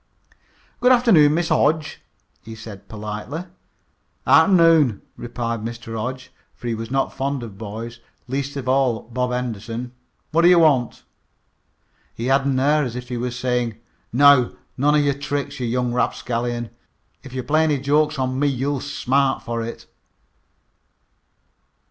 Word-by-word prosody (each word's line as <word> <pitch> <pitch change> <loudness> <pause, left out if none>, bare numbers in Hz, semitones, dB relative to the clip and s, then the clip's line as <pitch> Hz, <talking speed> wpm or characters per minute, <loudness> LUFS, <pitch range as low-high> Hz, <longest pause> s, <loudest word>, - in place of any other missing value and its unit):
"Good 250 +1 +4
afternoon, 210 -13 +5
Mr. 170 0 0
Hodge," 155 0 +1 0.4
he 110 +1 -10
said 110 -3 -11
politely. 105 +10 -6 0.8
"Arternoon," 165 - +5
replied 115 -1 -4
Mr. 115 0 -6
Hodge, 130 +4 -5 0.2
for - - -13
he 120 - -1
was 115 0 -5
not 135 +1 0
fond 135 -1 -2
of 105 -4 -10
boys, 115 +2 -7 0.3
least 140 +2 -3
of 130 -2 -5
all 130 -3 +2
Bob 125 +2 -2
Henderson. 120 0 -4 0.4
"What 165 +2 +3
d' 170 - +6
you 180 0 +7
want?" 145 -7 +3 1.1
He 115 - -4
had 135 +1 +2
an 135 -2 +1
air 150 +3 +3
as 125 -3 -4
if 125 0 -7
he 125 - -3
was 125 0 -3
saying: 125 -3 -1 0.3
"Now 140 -1 +5 0.2
none 145 +3 +2
of 150 -1 +3
your 140 - +2
tricks, 140 0 -4
you 125 - -2
young 125 0 -1
rapscallion! 120 -1 -2 0.5
If 130 -2 -12
you 130 -1 -3
play 155 +4 +2
any 150 -2 +2
jokes 150 +3 +1
on 130 0 -1
me 145 - +2
you'll 140 +1 -1
smart 135 -1 0
for 115 0 -3
it!" 115 - -7
130 Hz, 150 wpm, -22 LUFS, 120-145 Hz, 1.1 s, you